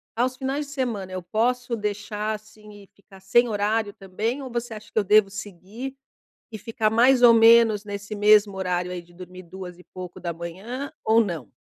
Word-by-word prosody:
aos 250 Hz, +3 st, 0 dB
finais 275 Hz, +2 st, -2 dB
de -, -, -12 dB
semana 230 Hz, -9 st, -3 dB
eu 185 Hz, 0 st, -4 dB
posso 235 Hz, +6 st, -1 dB
deixar, 210 Hz, 0 st, -3 dB
assim 215 Hz, 0 st, -12 dB
e -, -, -19 dB
ficar 195 Hz, -1 st, -18 dB
sem 240 Hz, +6 st, +3 dB
horário 210 Hz, 0 st, 0 dB
também? 215 Hz, +8 st, -4 dB
Ou 265 Hz, -, -7 dB
você 235 Hz, 0 st, -4 dB
acha 215 Hz, 0 st, -11 dB
que -, -, -10 dB
eu -, -, +1 dB
devo 210 Hz, 0 st, +4 dB
seguir 205 Hz, +6 st, -8 dB, 0.6 s
e 220 Hz, -, -6 dB
ficar 220 Hz, 0 st, -1 dB
mais 245 Hz, +3 st, +4 dB
ou 240 Hz, -1 st, +8 dB
menos 225 Hz, -2 st, +6 dB
nesse 205 Hz, 0 st, -6 dB
mesmo 205 Hz, -1 st, +4 dB
horário 180 Hz, -1 st, -2 dB
aí, 180 Hz, -1 st, -5 dB
de 175 Hz, 0 st, -22 dB
dormir 180 Hz, +1 st, -11 dB
duas 180 Hz, 0 st, -9 dB
e -, -, -15 dB
pouco 180 Hz, -1 st, -8 dB
da 170 Hz, -1 st, -4 dB
manhã? 195 Hz, -, -6 dB
Ou 225 Hz, +1 st, +5 dB
não? 170 Hz, -, -6 dB
210 Hz, 195 wpm, -24 LUFS, 190-230 Hz, 0.6 s, ou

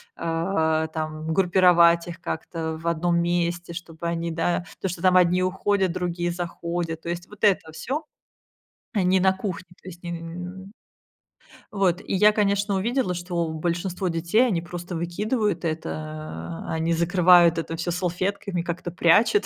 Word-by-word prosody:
а, 160 Hz, -1 st, 0 dB
там 155 Hz, 0 st, -4 dB
группировать 175 Hz, -2 st, +5 dB
их 170 Hz, -, -7 dB
как-то 160 Hz, 0 st, -4 dB
в 170 Hz, -, -5 dB
одном 170 Hz, +1 st, +1 dB
месте, 170 Hz, 0 st, -1 dB
чтобы 165 Hz, -1 st, -6 dB
они, 170 Hz, 0 st, -2 dB
да, 175 Hz, +2 st, 0 dB, 0.2 s
то, 190 Hz, -, 0 dB
что 175 Hz, -1 st, -5 dB
там 185 Hz, -1 st, +5 dB
одни 180 Hz, +1 st, +4 dB
уходят, 190 Hz, 0 st, +1 dB
другие 175 Hz, -1 st, -2 dB
заходят, 170 Hz, -1 st, -4 dB
то 170 Hz, -, -6 dB
есть 175 Hz, +1 st, -4 dB
вот 210 Hz, -1 st, -15 dB
это 185 Hz, -6 st, +3 dB
всё. 270 Hz, -, -3 dB, 0.9 s
Они 185 Hz, -2 st, +3 dB
на 190 Hz, 0 st, +5 dB
кухне, 190 Hz, -2 st, -5 dB
то -, -, -15 dB
есть 175 Hz, -1 st, -10 dB
не, 175 Hz, -, -5 dB
м 180 Hz, +4 st, -8 dB, 1.0 s
Вот, 190 Hz, -3 st, +1 dB
и -, -, -5 dB
я, 210 Hz, +2 st, +6 dB
конечно, 200 Hz, -1 st, +1 dB
увидела, 225 Hz, -1 st, 0 dB
что 175 Hz, -1 st, -2 dB
большинство 175 Hz, +4 st, -2 dB
детей, 170 Hz, +9 st, +2 dB
они 185 Hz, -9 st, 0 dB
просто 175 Hz, +1 st, -7 dB
выкидывают 190 Hz, +2 st, -1 dB
это, 160 Hz, 0 st, -2 dB, 0.8 s
а, -, -, -3 dB
они 165 Hz, +1 st, 0 dB
закрывают 175 Hz, 0 st, +5 dB
это 165 Hz, 0 st, -3 dB
всё 170 Hz, +2 st, -3 dB
салфетками, 180 Hz, +1 st, -2 dB
как-то 170 Hz, +1 st, -4 dB
прячут, 195 Hz, -, +4 dB
175 Hz, 155 wpm, -24 LUFS, 165-190 Hz, 1.0 s, я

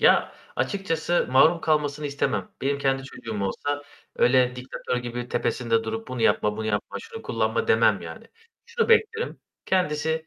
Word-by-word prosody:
Ya, -, -, +4 dB, 0.2 s
açıkçası 175 Hz, -4 st, 0 dB
mahrum 160 Hz, +6 st, +5 dB
kalmasını 150 Hz, -1 st, 0 dB
istemem. 105 Hz, -9 st, -1 dB
Benim 140 Hz, +1 st, +1 dB
kendi 135 Hz, -1 st, +1 dB
çocuğum 110 Hz, -6 st, -6 dB
olsa, 145 Hz, +9 st, -2 dB, 0.3 s
öyle, 125 Hz, 0 st, +4 dB
diktatör 125 Hz, 0 st, -4 dB
gibi 120 Hz, 0 st, -4 dB
tepesinde 115 Hz, -2 st, 0 dB
durup 110 Hz, +1 st, -4 dB
"Bunu 125 Hz, -2 st, -3 dB
yapma, 105 Hz, 0 st, +2 dB
bunu 110 Hz, -, -3 dB
yapma, 105 Hz, -1 st, -2 dB
şunu 455 Hz, 0 st, -9 dB
kullanma." 465 Hz, -1 st, -1 dB
demem 460 Hz, -, +4 dB
yani. -, -, -9 dB, 0.4 s
Şunu 470 Hz, 0 st, 0 dB
beklerim, 460 Hz, +1 st, +2 dB, 0.3 s
kendisi 160 Hz, -3 st, 0 dB
140 Hz, 145 wpm, -25 LUFS, 120-165 Hz, 0.4 s, mahrum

